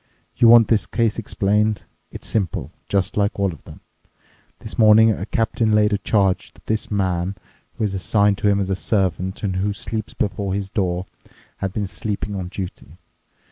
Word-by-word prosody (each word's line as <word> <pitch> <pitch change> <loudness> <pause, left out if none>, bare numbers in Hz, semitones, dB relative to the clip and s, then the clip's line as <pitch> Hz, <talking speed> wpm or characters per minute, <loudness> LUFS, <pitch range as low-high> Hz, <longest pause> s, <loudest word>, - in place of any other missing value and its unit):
You 120 - +5
want 115 -1 +8
this 110 -2 +2
case 115 -3 0
explained. 105 -1 0 0.3
It's - - -10
simple—just 100 -1 -2
like 100 0 +1
all 100 -3 +1
of 75 - -15
them. - - -12 0.8
This 110 - -9
morning 110 0 +7
a 100 -1 -4
captain 115 -1 0
laid 105 0 +3
a 100 - +1
charge 100 -4 +1
that - - -21
this 110 0 -1
man, 95 -2 -1 0.4
who - - -2
is 105 -2 0
assigned 100 +1 +2
to - - +1
him 100 0 +2
as 95 -1 -1
a - - +1
servant 95 -1 -1
and 95 -2 -1
who 100 +2 0
sleeps 110 +1 -4
before 100 -1 -2
his 100 -1 -4
door, 90 -3 -1 0.5
had 95 - -3
been 105 +1 -2
sleeping 100 +3 -4
on 95 -2 -4
duty. 90 -3 -8
100 Hz, 180 wpm, -21 LUFS, 95-105 Hz, 0.8 s, want